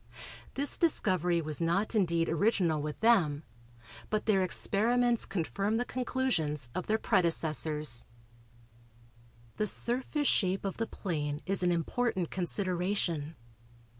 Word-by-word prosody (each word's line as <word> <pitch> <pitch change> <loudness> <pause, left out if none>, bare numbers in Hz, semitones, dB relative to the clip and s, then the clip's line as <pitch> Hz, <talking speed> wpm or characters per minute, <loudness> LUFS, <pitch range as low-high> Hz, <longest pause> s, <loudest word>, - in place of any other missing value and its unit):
This 280 +1 +4
discovery 180 - +2
was 155 +1 -3
not 175 +7 0
indeed 170 -6 +1
original 165 -3 +1
with 150 0 -5
them, 170 -11 +3 0.7
but 215 0 -1
their 200 -3 +3
experiments 235 +6 +2
confirmed 200 +5 -1
the 245 - -1
conclusions 220 - -2
of 185 - -4
their 220 - +2
predecessors. 155 - 0 1.5
The 215 - 0
surface 260 +7 0
shape 190 0 +1
of 195 - -3
the 225 - -2
plane 150 -5 -4
is 195 0 -1
an 180 -1 +2
important 180 - -1
consideration. 180 -4 -1
185 Hz, 115 wpm, -30 LUFS, 160-220 Hz, 1.5 s, This